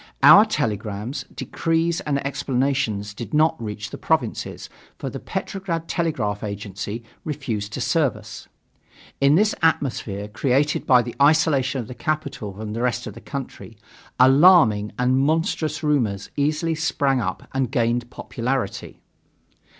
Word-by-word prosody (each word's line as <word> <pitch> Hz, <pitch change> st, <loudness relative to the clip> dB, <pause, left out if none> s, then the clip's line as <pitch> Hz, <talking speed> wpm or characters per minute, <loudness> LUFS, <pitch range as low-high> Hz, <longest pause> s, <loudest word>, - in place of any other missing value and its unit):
Our 210 Hz, -, +9 dB
telegrams, 115 Hz, -, -3 dB
decrees 165 Hz, +5 st, -1 dB
and 140 Hz, -2 st, -1 dB
explanations 130 Hz, -7 st, -1 dB
did 120 Hz, +7 st, -6 dB
not 155 Hz, +2 st, +4 dB
reach 105 Hz, 0 st, -5 dB
the -, -, -8 dB
provinces, -, -, -1 dB, 0.3 s
for -, -, -5 dB
the -, -, -6 dB
Petrograd 170 Hz, -4 st, -4 dB
Telegraph 120 Hz, -, -1 dB
Agency 105 Hz, +2 st, -5 dB, 0.2 s
refused 115 Hz, -9 st, -4 dB
to -, -, -4 dB
serve 155 Hz, -8 st, +1 dB
us. 105 Hz, 0 st, -11 dB, 0.7 s
In 140 Hz, +2 st, +5 dB
this 210 Hz, +4 st, +3 dB
atmosphere, 120 Hz, -10 st, 0 dB
created 135 Hz, +6 st, 0 dB
by 125 Hz, -2 st, +6 dB
the 120 Hz, -, -6 dB
isolation 140 Hz, -3 st, +3 dB
of 115 Hz, -, -9 dB
the 125 Hz, -, -7 dB
capital 155 Hz, -8 st, -3 dB
from 105 Hz, +1 st, -6 dB
the 115 Hz, -, -3 dB
rest 125 Hz, -4 st, -1 dB
of 105 Hz, -, -7 dB
the 115 Hz, -, -12 dB
country, 135 Hz, -5 st, -7 dB, 0.4 s
alarming 130 Hz, -, +6 dB
and 125 Hz, +1 st, +2 dB
monstrous 155 Hz, +1 st, 0 dB
rumors 120 Hz, -10 st, 0 dB
easily 155 Hz, +3 st, 0 dB
sprang 140 Hz, -5 st, 0 dB
up -, -, -4 dB
and 135 Hz, -2 st, 0 dB
gained 120 Hz, 0 st, 0 dB
popularity. 130 Hz, +2 st, -4 dB
130 Hz, 135 wpm, -23 LUFS, 110-155 Hz, 0.7 s, Our